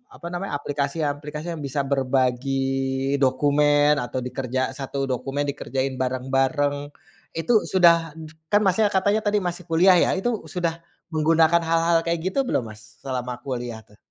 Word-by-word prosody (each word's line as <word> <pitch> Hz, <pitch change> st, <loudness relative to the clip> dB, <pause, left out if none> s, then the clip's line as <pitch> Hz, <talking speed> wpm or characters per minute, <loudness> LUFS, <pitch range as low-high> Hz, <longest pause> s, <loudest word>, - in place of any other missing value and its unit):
apa -, -, -12 dB
namanya, 180 Hz, -1 st, -4 dB
aplikasi-aplikasi 145 Hz, +2 st, -3 dB
yang 155 Hz, -, -7 dB
bisa 135 Hz, +1 st, -3 dB
berbagi 135 Hz, +1 st, 0 dB
dokumen, 145 Hz, +2 st, +3 dB
atau 130 Hz, +1 st, -4 dB
dikerja 130 Hz, 0 st, -3 dB, 0.2 s
satu 135 Hz, 0 st, -3 dB
dokumen 135 Hz, +3 st, -2 dB
dikerjain 135 Hz, -1 st, -3 dB
bareng-bareng 135 Hz, +3 st, 0 dB, 0.6 s
itu 165 Hz, +9 st, 0 dB, 0.2 s
sudah 175 Hz, -3 st, +6 dB, 0.6 s
kan, 205 Hz, +1 st, +4 dB
Masnya, 205 Hz, +3 st, +3 dB
katanya 200 Hz, +3 st, +2 dB
tadi 205 Hz, 0 st, +2 dB
masih 175 Hz, +1 st, -5 dB
kuliah 180 Hz, +3 st, +5 dB
ya -, -, 0 dB
itu 240 Hz, -, 0 dB, 0.2 s
sudah 170 Hz, 0 st, -2 dB, 0.4 s
menggunakan 160 Hz, +2 st, +3 dB
hal-hal 165 Hz, 0 st, +3 dB
kayak 170 Hz, 0 st, 0 dB
gitu -, -, -1 dB
belum, 130 Hz, -, 0 dB
Mas, 110 Hz, +1 st, -17 dB
selama 125 Hz, -2 st, -3 dB
kuliah 120 Hz, -4 st, -4 dB
tuh? 105 Hz, -, -22 dB
145 Hz, 140 wpm, -23 LUFS, 130-165 Hz, 0.6 s, sudah